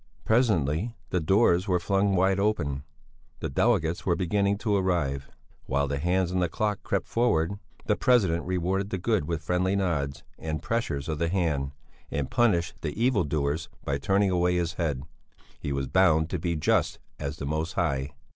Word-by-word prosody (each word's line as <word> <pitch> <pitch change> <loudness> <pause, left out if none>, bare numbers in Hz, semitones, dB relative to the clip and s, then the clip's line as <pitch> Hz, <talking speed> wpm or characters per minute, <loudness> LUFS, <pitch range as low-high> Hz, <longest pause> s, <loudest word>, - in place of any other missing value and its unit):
Presently 110 - +2 0.2
the 90 - +2
doors 90 +2 +3
were 90 -2 +2
flung 95 +2 +1
wide 95 +1 +3
open; 85 -10 0 0.6
the - - -3
delegates 85 - +1
were 90 - +2
beginning 100 +3 +1
to 105 -1 0
arrive, 85 -8 0 0.4
while 70 +2 +1
the 70 0 -2
hands 90 +3 +1
on 90 - 0
the 90 -2 +1
clock 105 +3 -1
crept - - -1
forward 85 -9 +2
forward. 100 - -6 0.3
The - - +2
president 95 -10 +2
rewarded 95 +2 0
the 95 - -2
good 105 -2 0
with 85 -2 -2
friendly 90 +3 +1
nods 80 -8 -1 0.2
and 80 -1 -3
pressures 75 -10 -2
of 80 -2 -2
the 85 - +1
hand, 75 -7 0 0.4
and 70 -2 -3
punished 95 -8 +1
the 75 +5 -4
evil 120 -2 +3
doers 75 +2 -1 0.2
by 70 0 -1
turning 95 +5 +2
away 90 0 +2
his 85 -1 0
head; 75 -7 -2 0.6
he 70 - -4
was 70 0 -1
bound 80 0 +3
to 90 - -1
be 85 +1 -1
just 85 -1 +1 0.2
as 70 +2 -4
the 70 - -5
Most 80 +3 -2
High. 70 -3 -1
85 Hz, 180 wpm, -27 LUFS, 75-100 Hz, 0.6 s, doors